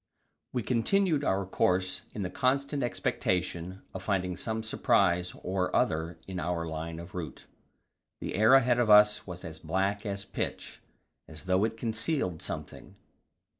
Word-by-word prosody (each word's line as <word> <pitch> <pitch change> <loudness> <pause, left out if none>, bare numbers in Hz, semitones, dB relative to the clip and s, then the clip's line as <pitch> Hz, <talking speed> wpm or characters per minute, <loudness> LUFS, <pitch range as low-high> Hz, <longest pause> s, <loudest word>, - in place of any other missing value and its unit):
We 125 -3 -1
continued 150 - +2
our 95 -5 +1
course 95 0 0
in 105 - -2
the 90 - -3
constant 140 +2 +1
expectation 90 -6 -1
of 95 - -5
finding 90 -2 -1
some 110 +3 -3
surprise 90 -5 +2
or 90 0 -1
other 80 +2 +1
in 95 -2 -5
our 85 -1 -1
line 80 0 -5
of 85 +1 -9
route. 85 -4 -6 0.7
The - - -4
air 110 +6 +6
ahead 125 -2 +4
of 120 -3 +2
us 105 0 +6
was 90 -1 -7
as 80 -1 -8
black 95 +5 -1
as 100 -1 -4
pitch, - - -5 0.5
as 80 0 -9
though 95 +2 +2
it 115 0 -3
concealed 115 - -1
something. - - -7
95 Hz, 150 wpm, -29 LUFS, 90-115 Hz, 0.7 s, air